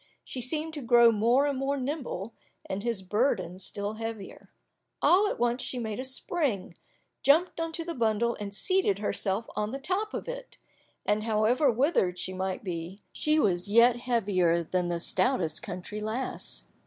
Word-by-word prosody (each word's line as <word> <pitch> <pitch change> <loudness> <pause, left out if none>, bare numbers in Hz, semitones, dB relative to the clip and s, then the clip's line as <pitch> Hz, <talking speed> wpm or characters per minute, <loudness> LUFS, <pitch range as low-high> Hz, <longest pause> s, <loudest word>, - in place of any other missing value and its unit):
She 255 - -6
seemed 310 +6 -1
to 295 - -5
grow 235 -1 +6
more 235 +6 +3
and 280 -2 -1
more 275 +1 0
nimble, 255 - -4 0.3
and 190 +1 -4
his 230 -4 -2
burden 190 -3 0
still 205 +2 -4
heavier. 225 -2 -7 0.5
All 390 +4 +5
at - - -2
once 240 +1 +1
she 255 - -3
made 220 -2 -3
a 260 - -3
spring, 265 - -1 0.5
jumped 330 +5 +3
on 330 0 -2
to 330 0 -2
the 340 - -3
bundle 235 -1 +1
and 205 -1 -5
seated 285 - +2
herself 205 +1 -1
on 210 0 -1
the 270 - -4
top 380 +9 -2
of - - -5
it; - - -7 0.5
and 210 +1 +1
however 230 +6 +3
withered 235 - +2
she 185 - -3
might 185 +1 -3
be, 180 +1 -6
she 305 0 +1
was 185 - +1
yet 235 +3 +6
heavier 195 -9 +1
than 180 +2 -1
the 170 -1 -1
stoutest 175 - +1
country 185 +4 -6
lass. 220 +5 -4
230 Hz, 170 wpm, -28 LUFS, 200-275 Hz, 0.5 s, grow